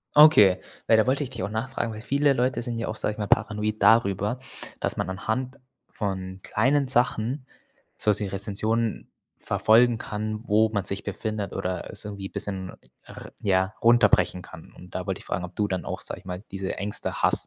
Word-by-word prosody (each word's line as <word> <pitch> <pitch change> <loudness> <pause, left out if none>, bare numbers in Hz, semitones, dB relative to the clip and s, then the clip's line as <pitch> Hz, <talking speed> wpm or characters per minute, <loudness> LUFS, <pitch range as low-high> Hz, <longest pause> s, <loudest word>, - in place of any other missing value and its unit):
Okay. 145 -12 +8 0.3
Ja, 110 - +7
da 110 - +3
wollte 135 +3 +2
ich 135 - -6
dich 120 -5 -6
auch 100 - -2
nachfragen, 115 +1 -3
weil 105 - -8
viele 140 +3 +2
Leute 125 0 0
sind 120 -1 -4
ja 115 - -3
auch, 110 - -4
sage 105 - -1
ich - - -15
mal, 105 -1 -3
paranoid 105 +1 +1
darüber, 105 0 +3 0.4
dass - - 0
man - - -2
anhand 110 +7 -3 0.3
von 95 -2 -4
kleinen 140 0 +2
Sachen 125 +1 0 0.5
sowas 105 -1 +2
wie 105 - -2
Rezensionen 105 +4 -1 0.3
verfolgen 115 +2 +3
kann, 110 0 -4
wo 110 +1 +4
man 100 -3 -2
sich 100 +1 -2
befindet 110 -3 -4
oder 90 0 -3
es - - -4
irgendwie 100 -2 -6
bisschen 95 -2 -3 0.3
r - - -11
ja, 95 0 +1
runterbrechen 115 -5 +4
kann. - - -13
Und - - -14
da - - -4
wollte - - -2
ich - - -13
fragen, 90 - -2
ob 90 - -13
du 105 - +1
dann 95 -2 -3
auch, - - -4
sage - - -4
ich - - -22
mal, 90 +1 -6
diese 95 -1 -4
Ängste 100 +1 -3
hast. - - +3
110 Hz, 195 wpm, -25 LUFS, 100-120 Hz, 0.5 s, Okay